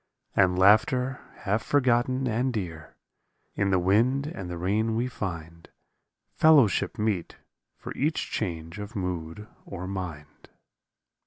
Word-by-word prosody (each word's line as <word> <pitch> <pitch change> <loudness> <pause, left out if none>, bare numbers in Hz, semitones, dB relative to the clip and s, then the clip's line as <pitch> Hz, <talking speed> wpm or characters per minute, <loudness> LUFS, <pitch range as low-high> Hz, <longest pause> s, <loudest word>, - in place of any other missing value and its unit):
And 90 -1 +3
laughter 125 +7 +3 0.2
half 105 +3 0
forgotten 130 -1 +1
and 125 +3 0
dear; 85 -8 -6 0.6
In 100 -1 0
the 95 - +3
wind 115 +10 +2
and 95 - -6
the 90 - -5
rain 105 +6 0
we 120 +2 0
find 85 -8 -6 0.6
Fellowship 140 - +4
meet 105 -6 -2 0.4
for - - -7
each 155 +4 -1
change 85 -2 -4
of 105 +3 -7
mood 90 +1 -4 0.2
or 90 -2 -7
mind. 90 -6 -7
100 Hz, 125 wpm, -27 LUFS, 90-120 Hz, 0.6 s, Fellowship